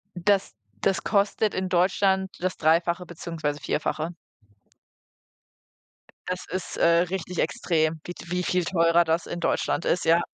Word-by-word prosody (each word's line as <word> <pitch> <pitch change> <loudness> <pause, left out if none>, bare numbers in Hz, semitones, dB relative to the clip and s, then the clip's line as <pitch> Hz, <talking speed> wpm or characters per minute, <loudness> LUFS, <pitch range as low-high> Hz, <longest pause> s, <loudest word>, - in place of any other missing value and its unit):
das 190 +2 +1 0.3
das 190 -3 +1
kostet 205 +1 +1
in 185 0 -2
Deutschland 190 +1 +2
das 185 0 -2
Dreifache 170 +3 +2
beziehungsweise 165 -3 -4
Vierfache. 155 +3 -2 2.1
Das 180 0 -3
ist, 185 0 -4
äh, - - +2 0.3
richtig 180 -2 -4
extrem, 160 -1 0
wie 175 - -5
t 170 - -12
wie 180 0 0
viel 180 0 0
teurer 170 0 +3
das 165 +1 0
in 175 - -5
Deutschland 170 - 0
ist, 175 - +1
ja. 165 +1 +5
175 Hz, 140 wpm, -25 LUFS, 165-185 Hz, 2.1 s, ja